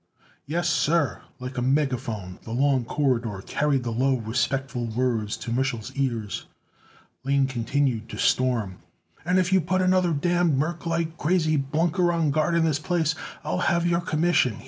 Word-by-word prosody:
"Yes, 170 Hz, +3 st, -1 dB
sir." 165 Hz, -2 st, +1 dB, 0.2 s
Like 125 Hz, 0 st, -5 dB
a -, -, -1 dB
megaphone 120 Hz, -9 st, -1 dB
the 115 Hz, -, -6 dB
long 135 Hz, -1 st, +2 dB
corridor 115 Hz, -8 st, -1 dB
carried 145 Hz, -3 st, 0 dB
the 120 Hz, -, -3 dB
low, 130 Hz, +4 st, +2 dB
respectful 125 Hz, +2 st, -1 dB
words 115 Hz, -2 st, -1 dB
to 115 Hz, -, -6 dB
Mich'l's 120 Hz, -3 st, -1 dB
ears. 120 Hz, -7 st, -2 dB, 0.8 s
Lane 140 Hz, 0 st, +2 dB
continued 130 Hz, -2 st, -1 dB
to -, -, -7 dB
storm: 115 Hz, -8 st, +1 dB, 0.4 s
"And 180 Hz, +4 st, +2 dB
if 185 Hz, 0 st, +2 dB
you 190 Hz, -, +5 dB
put 185 Hz, +3 st, 0 dB
another 185 Hz, -1 st, +3 dB
damned 170 Hz, 0 st, +2 dB
merclite 165 Hz, +1 st, -2 dB
crazy 155 Hz, -1 st, +2 dB
blunker 165 Hz, +5 st, +1 dB
on 165 Hz, -4 st, +1 dB
guard 155 Hz, +3 st, +1 dB
in 165 Hz, -1 st, +3 dB
this 150 Hz, -3 st, +1 dB
place 165 Hz, -1 st, 0 dB, 0.3 s
I'll 90 Hz, -, -1 dB
have 170 Hz, 0 st, +1 dB
your 175 Hz, 0 st, +2 dB
commission. 155 Hz, -, +1 dB
140 Hz, 155 wpm, -25 LUFS, 120-170 Hz, 0.8 s, you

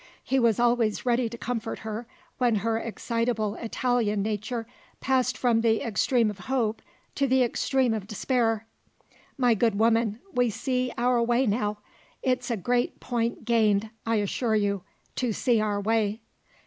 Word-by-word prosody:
He 265 Hz, +1 st, +1 dB
was 230 Hz, -3 st, +3 dB
always 235 Hz, -2 st, +2 dB
ready 240 Hz, -1 st, +2 dB
to 235 Hz, -, -8 dB
comfort 230 Hz, -1 st, -3 dB
her, 220 Hz, +2 st, -4 dB, 0.3 s
when 245 Hz, -3 st, +3 dB
her 225 Hz, 0 st, +1 dB
excitable 230 Hz, -2 st, -1 dB
Italian 230 Hz, -3 st, 0 dB
nature 220 Hz, +2 st, -3 dB, 0.3 s
passed 255 Hz, -1 st, +1 dB
from 235 Hz, -3 st, +2 dB
the 225 Hz, -1 st, +2 dB
extreme 230 Hz, +1 st, +2 dB
of 200 Hz, -, -12 dB
hope 225 Hz, +1 st, -1 dB, 0.3 s
to 275 Hz, -, +1 dB
the 260 Hz, 0 st, +4 dB
extreme 250 Hz, 0 st, +1 dB
of 210 Hz, -3 st, -4 dB
despair. 225 Hz, 0 st, 0 dB, 0.7 s
"My 245 Hz, -3 st, +4 dB
good 225 Hz, -1 st, +1 dB
woman, 225 Hz, 0 st, +2 dB
we 245 Hz, -1 st, +2 dB
see 255 Hz, +3 st, -1 dB
our 245 Hz, 0 st, +2 dB
way 240 Hz, +3 st, +2 dB
now: 210 Hz, -1 st, 0 dB, 0.5 s
it's 255 Hz, -1 st, 0 dB
a 235 Hz, -, 0 dB
great 245 Hz, +5 st, 0 dB
point 235 Hz, -1 st, -2 dB
gained, 215 Hz, -3 st, +2 dB
I 230 Hz, 0 st, 0 dB
assure 220 Hz, +2 st, 0 dB
you, 200 Hz, -2 st, +1 dB, 0.4 s
to 245 Hz, -3 st, 0 dB
see 230 Hz, +1 st, +2 dB
our 205 Hz, -1 st, 0 dB
way." 215 Hz, +1 st, 0 dB
230 Hz, 155 wpm, -27 LUFS, 215-245 Hz, 0.7 s, the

